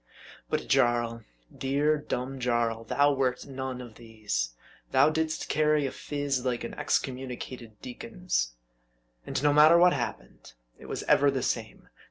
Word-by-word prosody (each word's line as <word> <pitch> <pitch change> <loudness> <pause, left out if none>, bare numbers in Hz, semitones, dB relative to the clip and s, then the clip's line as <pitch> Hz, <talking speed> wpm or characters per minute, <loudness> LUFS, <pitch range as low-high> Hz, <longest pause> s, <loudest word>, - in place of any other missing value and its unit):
But - - -1
Jarl, 120 -3 +2 0.3
dear, 145 +3 +1
dumb 135 -2 -4
Jarl, 120 -2 0
thou 145 +5 +3
wert 130 -2 -1
none 130 -2 -5
of 120 -3 -10
these. 105 - -3 0.3
Thou 140 +4 +4
didst 160 +1 -2
carry 150 -1 +2
a 135 - -2
phiz 145 -3 -2
like 125 -2 -1
an 115 - -5
excommunicated 125 -5 -3
deacon's. - - -3 0.7
And 135 - -2
no 145 0 +4
matter 155 +3 +7
what 180 +1 +6
happened, 120 -4 -6 0.3
it - - -12
was - - -4
ever 145 0 +4
the 135 -3 -1
same. 110 -2 -3
130 Hz, 145 wpm, -28 LUFS, 120-145 Hz, 0.7 s, matter